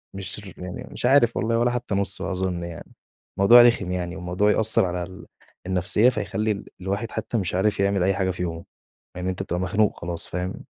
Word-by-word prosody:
مش 95 +1 -5
ر 100 -3 -11
يعني 90 +8 -7
مش - - -4
عارف 125 -3 +4
والله 115 -1 +1
ولا 120 +1 +2
حتى 120 -4 -3
نُصه 100 0 -1
أظن 90 -2 -2
يعني. 85 -2 -9 0.5
موضوع 120 +5 +8
رخم 115 -6 +3
يعني 90 0 -3
وموضوع 95 +3 +1
يأثّرعلى 90 -5 +2
ال 95 +1 -10 0.4
النفسية، 95 +6 +3
فيخلّي 105 -1 -2 0.2
الواحد 100 +4 -3
حتى 110 +2 -3
مش 90 -3 -2
عارف 100 +2 +1
يعمل 100 -2 +2
أي 95 - +2
حاجة 95 -1 0
في 90 - -7
يومه، 85 -1 -5 0.5
لأن 90 0 -4
أنت 95 +1 -2
بتبقى 90 -2 -3
مخنوق 105 +2 +1
خلاص 85 -1 -1
فاهم؟ 90 +1 -5
95 Hz, 190 wpm, -24 LUFS, 90-110 Hz, 0.5 s, موضوع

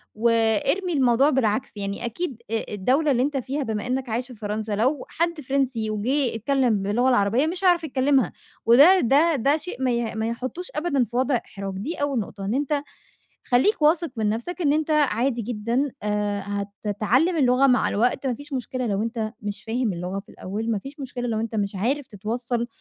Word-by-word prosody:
وإرمي 230 - +2
الموضوع 265 0 +4
بالعكس، 245 -5 0
يعني 200 +1 -3
أكيد 245 +2 -4
أ 225 -1 -2
الدولة 260 +10 +2
اللي 250 -2 +2
أنت 285 0 -1
فيها 270 +3 -2
بما 220 -2 -3
إنك 255 0 -2
عايش 240 +3 -2
في 255 - -11
فرنسا 210 0 -3
لو 255 +6 0
حد 335 -1 -1
فرنسي 260 -5 -1
وجِه 240 +4 0
اتكلم 240 -3 +1
باللغة 230 +6 +2
العربية 245 +4 +3
مش 355 +4 -3
هيعرف 350 -2 +4
يتكلمها، 265 - +2 0.3
وده 285 +11 +7
ده 300 +6 +4
ده 280 +4 +2
شيء 320 -5 -6
ما 255 - +2
ي 235 -2 -1
ما 220 0 -1
يحطوش 255 +10 -4
أبدًا 300 -4 +1
في 235 - -12
وضع 260 +2 +2
إحراج. 195 -4 -5
دي 275 - -4
أول 285 -3 -1
نقطة 200 -1 -6
إن 205 - -1
أنت 285 +2 0 0.6
خلّيك 270 - +3
واثق 325 +2 +3
من 215 -2 0
نَفسك 295 - -3
إن 290 -3 +3
أنت 310 +1 0
عادي 260 -4 +2
جدًا، 235 +5 -1
آآ، 205 -1 -1 0.4
هتتعلم 240 - +2
اللغة 260 -1 +4
مع 250 -1 +3
الوقت، 245 +5 0
ما 255 - +1
فيش 285 +4 -9
مشكلة 255 0 -3
لو 200 -1 0
أنت 225 -1 -3
مش 205 0 -5
فاهم 225 -2 -1
اللغة 180 +3 -4
في 195 - -15
الأول، 220 +4 -4
ما 210 - 0
فيش 275 +6 -11
مشكلة 250 -2 -4
لو 220 -2 -1
أنت 225 0 -3
مش 200 -1 -1
عارف 255 +8 -1
تتوصّل 235 +3 -3
245 Hz, 190 wpm, -24 LUFS, 220-280 Hz, 0.6 s, وده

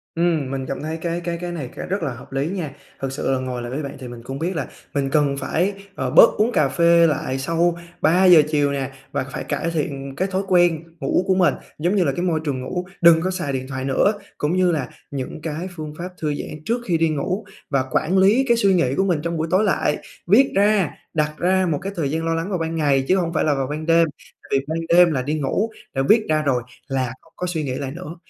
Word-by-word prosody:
Ừm, 165 -5 +1
mình 135 -1 -3
cảm 135 - -4
thấy 155 +2 -3
cái 170 +1 -3
cái 170 0 -3
cái 175 0 -4
này 150 -8 -5
cái - - -6
rất 190 -1 -2
là 140 -5 -2
hợp 120 - -13
lý 135 +2 -1
nha. 175 -6 -3 0.3
Thực 135 -1 -3
sự 135 0 -2
là 130 - +1
ngồi 130 -1 -4
lại 120 0 -6
với 145 +4 -3
bạn 140 - -6
thì 130 - -7
mình 120 -1 -9
cũng 135 +3 -6
biết 175 +4 -2
là 145 -5 -2 0.3
mình 140 -1 0
cần 140 -1 +2
phải, 180 +7 0 0.2
ờ, - - -2
bớt - - +8
uống 220 +3 +2
cà 155 - +3
phê 170 +1 +5
lại 135 -3 -1
sau 165 +4 +1 0.2
3:00 175 +1 +6
chiều 145 -2 +2
nè 135 -1 -3 0.2
và - - -1
phải - - -4
cải 165 - -2
thiện 140 -4 -3
cái 190 - +1
thói 190 +1 0
quen 175 -3 +3 0.2
ngủ 180 - +1
của 190 - +3
mình, 185 -2 +4 0.3
giống 175 +6 +1
như 190 - +3
là, 140 - +1
cái - - -2
môi 165 -3 +1
trường 135 -4 -2
ngủ, 180 +7 -3 0.2
đừng 170 -1 +7
có 185 +2 0
xài 175 -7 -3
điện 130 0 -3
thoại 130 -1 -4
nữa. 135 +9 +3 0.3
Cũng 150 +4 0
như 185 -1 +3
là 140 -7 -2 0.2
những 140 +2 -5
cái 160 +3 -4
phương 155 -2 -6
pháp 175 +2 -5
thư 150 -2 0
giãn 150 +1 -7
trước 235 +2 0
khi 175 -5 +1
đi 165 0 +2
ngủ, 180 +8 -2 0.2
và 135 -2 +1
quản 180 +5 +1
lý 205 +8 +5
cái 235 -1 +4
suy 200 -4 +4
nghĩ 135 -7 +2
của 190 - +2
mình 175 -5 +1
trong 170 0 -2
buổi 160 +1 -1
tối 190 +3 +4
lại, 180 -7 +1 0.3
viết 245 +9 +5
ra, 200 -1 +3 0.2
đặt 150 -1 0
ra 185 +1 +2
một 145 - 0
cái 195 - -4
thời 155 -5 -1
gian 160 +1 -1
lo 165 - +1
lắng 165 +3 -2
vào 190 - -1
ban 165 0 -2
ngày 140 -4 +2
chứ 185 - +4
hông 170 -2 -1
phải - - +1
là 150 - +2
vào 135 -1 -1
ban 150 +2 -4
đêm, 165 0 +4 0.4
tại - - -18
vì 135 0 +1
ban 160 +2 -2
đêm 175 0 +6
là 135 -4 0
đi 145 +4 -2
ngủ, 195 +11 0 0.2
đã 135 - 0
viết 220 0 +5
ra 155 0 +3
rồi 130 -5 0 0.2
là 130 -2 -1
không 165 - -25
có 180 - -3
suy 160 -3 -2
nghĩ 130 -3 -3
lại 135 0 -4
nữa. 170 +1 -8
160 Hz, 265 wpm, -22 LUFS, 140-180 Hz, 0.4 s, bớt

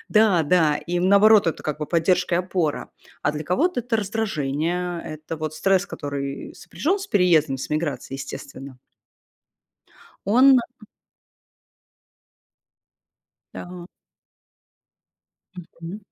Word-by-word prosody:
Да, 210 -6 +4
да, 155 -1 +3
и 175 +3 -3
наоборот 200 +2 +5
это 165 - -2
как 150 0 -3
бы 150 - -4
поддержка 175 +2 +1
и - - +2
опора. 180 -4 -2 0.3
А 145 - +1
для 150 +1 -5
кого-то 290 - +1
это 240 -1 -1
раздражение, 175 -4 -2
это 155 +1 -7
вот 155 0 -4
стресс, 195 +3 +2
который 140 -5 -6
сопряжён 315 - -2
с 390 - -7
переездом, 165 - +3
с 130 - -6
эмиграцией, 145 -4 -3
естественно. 135 -1 -9 1.5
Он, 255 +5 +6
э 235 -2 -8 2.7
Да. 180 0 -9 1.7
Мгм. 170 +2 -9
175 Hz, 110 wpm, -23 LUFS, 150-200 Hz, 2.7 s, Он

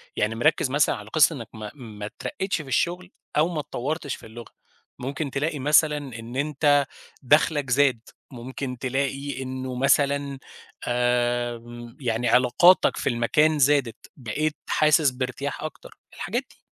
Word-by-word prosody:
يعني 110 +2 0
مركِّز 145 +2 +2
مثلًا 145 +2 +3
على 105 0 -10
قِصّة 155 +3 +4
إنك 115 -4 -7
ما 110 -1 -7
ما 110 -6 -8
اترقّيتش 160 - -4
في 145 - -12
الشغل 175 +7 -1 0.3
أو 155 +3 +4
ما 160 -3 -3
اتطوّرتش 145 +1 -3
في - - -14
اللغة، 115 +1 -11 0.5
ممكن 140 +3 -4
تلاقي 150 +2 -2
مثلًا 150 +2 +4 0.2
إن 115 +2 -9
أنت 145 0 +2 0.4
دخلَك 145 0 +3
زاد، 130 -2 +3 0.3
ممكن 125 +1 -6
تلاقي 135 +1 -2
إنه 130 0 -5
مثلًا 140 +1 +2 0.5
آآ، 120 -1 0 0.4
يعني 120 -2 0
علاقاتك 130 +9 +5
في - - -1
المكان 150 +6 +2
زادت، 140 -4 +2
بقيت 150 +5 -2
حاسس 155 -2 +4
بارتياح 130 +3 -4
أكتر، 155 - -8 0.2
الحاجات - - -2
دي. - - -21
135 Hz, 140 wpm, -25 LUFS, 120-150 Hz, 0.5 s, علاقاتك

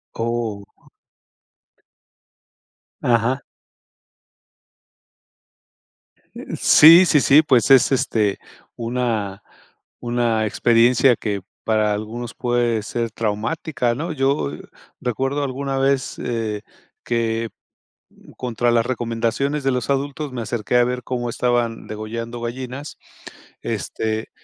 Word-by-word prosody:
Oh. 115 -3 -3 2.3
Ajá. 120 +3 +1 2.9
Eh, - - -8
sí, 165 +4 +8
sí, 155 - +4
sí, 145 +4 +6
pues 130 -6 +3
es, 135 0 +6
este, 110 -6 +1 0.4
una 115 -4 -2 0.6
una 120 -2 0
experiencia 120 +4 +4
que 100 -4 -3 0.2
para 110 -1 +1
algunos 115 +3 -5
puede 120 -3 0
ser 115 0 -3
traumática, 115 +4 -2
¿no? 165 +6 -4
Yo, 135 - 0
eh, - - -8 0.4
recuerdo 135 +4 -1
alguna 135 0 -3
vez, 135 -1 0
eh, 110 -3 -3 0.4
que 115 -1 -1 0.7
m - - -17
contra 120 -1 -1
las 115 0 +2
recomendaciones 120 +4 -1
de 135 - +2
los 125 +1 -2
adultos 140 +1 -2
me 120 -2 -4
acerqué 115 +1 -1
a 120 - +5
ver 125 +1 -3
cómo 120 -1 -3
estaban 120 -1 -1
degollando 115 +2 -6
gallinas, 130 +4 -6 0.7
este, 110 0 -3
120 Hz, 105 wpm, -21 LUFS, 115-130 Hz, 2.9 s, sí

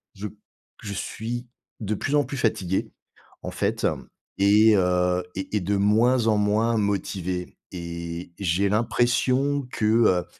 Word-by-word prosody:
je 100 +2 -5 0.6
je 100 - -5
suis 120 +4 -5 0.3
de 105 -1 -2
plus 145 +8 -1
en 145 - +3
plus 135 +2 -6
fatigué 95 -6 0 0.5
en - - -4
fait - - 0 0.5
et 105 +2 +5
heu, 90 -1 +2
et 95 +2 -4
et 100 - -1
de 100 +3 0
moins 115 +4 +3
en 110 - +4
moins 105 +3 +2
motivé 95 -3 -2 0.2
et 85 0 -6
j'ai 95 +1 +1
l'impression 125 +5 +1
que, 105 - -2
heu, 105 -6 +3
105 Hz, 140 wpm, -25 LUFS, 90-115 Hz, 0.6 s, et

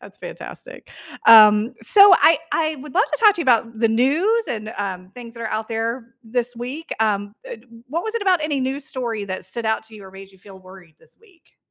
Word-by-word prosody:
that's - - -15
fantastic. - - -10 0.4
Um, 215 +1 +7
so 400 - +6
I 325 -3 +4
I 310 -1 -1
would 295 +1 -12
love 410 +5 +3
to - - -4
talk 425 -3 +6
to 345 - -5
you - - 0
about 230 -2 +1
the 225 -1 +2
news 320 - +1
and, 215 0 -5
um, 185 -2 -5
things 235 +2 -12
that 235 - -11
are 225 - -4
out 220 +1 -4
there 230 +1 -4
this 245 +1 -3
week. 265 +7 -7
Um, 205 -2 -1
eh, - - -8 0.3
what 335 +7 -4
was 440 - -5
it 465 - -2
about 365 -5 +1
any 290 -3 -2
news 265 +2 -3
story 235 -8 -5
that 185 -1 -6
stood 225 +5 -6
out 220 0 -1
to 220 0 -16
you 205 -2 -13
or 190 - -13
made 195 0 -13
you 190 - -22
feel 190 0 -15
worried 185 -3 -17
this - - -17
week? 390 -7 -27
230 Hz, 230 wpm, -20 LUFS, 210-305 Hz, 0.4 s, Um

